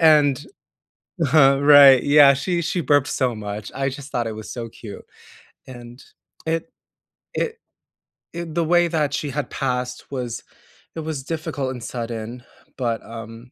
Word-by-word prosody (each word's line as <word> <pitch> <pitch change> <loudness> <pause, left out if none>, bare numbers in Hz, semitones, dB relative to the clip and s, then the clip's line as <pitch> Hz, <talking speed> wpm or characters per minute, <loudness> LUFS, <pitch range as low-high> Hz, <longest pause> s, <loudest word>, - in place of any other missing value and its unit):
and, 150 -4 +5 0.9
huh, 135 -1 +5
right. 140 -3 +8
Yeah, 145 -1 +7
she 170 +5 -1
she 180 +2 -2
burped 145 -2 +2
so 125 -3 0
much, 105 -1 -6
I 135 0 -1
just 140 +1 -9
thought 120 -2 -1
it - - -4
was 110 - -9
so 115 -2 -6
cute, 105 -2 -11 0.6
and 120 0 -11 0.5
it 165 +7 -2 0.6
it 460 0 -2 0.8
it 170 -1 -6
the 170 - +2
way 175 +1 +3
that 150 -3 0
she 145 - -2
had 145 - -2
passed 125 -1 -3
was 125 -3 -4 0.6
it 160 - -4
was 155 -4 -4
difficult 145 -5 -3
and 120 - -9
sudden, 115 0 -6 0.4
but, 115 -3 -1
um 115 +2 -10
135 Hz, 150 wpm, -22 LUFS, 120-150 Hz, 0.9 s, right